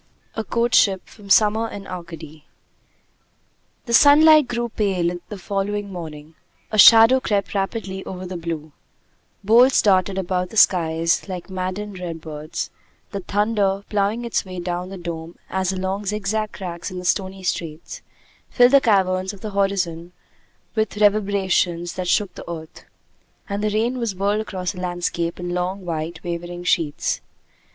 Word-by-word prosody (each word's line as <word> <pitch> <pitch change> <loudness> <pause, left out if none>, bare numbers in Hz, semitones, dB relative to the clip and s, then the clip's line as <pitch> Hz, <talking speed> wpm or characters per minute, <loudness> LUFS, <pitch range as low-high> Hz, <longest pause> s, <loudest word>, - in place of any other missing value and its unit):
A 225 - -3
COURTSHIP 220 -4 +2
From 205 -2 -15
'Summer 220 +2 +4
in 200 -3 -8
Arcady' 165 -4 -9 1.4
The 235 - -4
sunlight 300 +2 +7
grew 240 -1 -2
pale 180 -5 -1
the 210 - -6
following 200 +1 -3
morning; 160 -3 -8 0.4
a 215 - 0
shadow 225 +5 +9
crept 205 -5 -1
rapidly 195 -1 -3
over 185 0 -6
the 185 0 -6
blue; 165 -2 -5 0.7
bolts 240 +6 +5
darted 190 -1 +2
about 180 -1 -1
the 220 - -8
skies 170 -2 +3
like 185 0 -6
maddened 185 +2 -4
redbirds; 160 -3 -6 0.4
the 200 - -3
thunder, 200 0 0
ploughing 210 +3 0
its 235 - -1
way 185 -1 -7
down 175 +1 -3
the 195 - -7
dome 170 -1 -7
as 190 0 0
along 190 +2 -3
zigzag 210 +1 -1
cracks 170 -2 -6
in 185 - -7
the 180 - -6
stony 190 +1 -1
street, 165 -3 -4 0.5
filled 245 0 +5
the 275 -1 +6
caverns 190 -4 +1
of 195 - -13
the 215 - -5
horizon 185 -4 -1 0.6
with 220 -2 -1
reverberations 195 -4 +1
that 185 -1 -4
shook 195 +1 +1
the - - -10
earth; 160 -1 -9 0.6
and 200 +1 -3
the 215 - +2
rain 230 +4 0
was 230 -5 -2
whirled 200 +3 0
across 185 -4 -4
the 180 - -9
landscape 175 -1 -2
in 175 0 -4
long, 180 +2 -3
white, 165 0 -4
wavering 175 0 -5
sheets. 165 -4 0
190 Hz, 150 wpm, -22 LUFS, 175-210 Hz, 1.4 s, shadow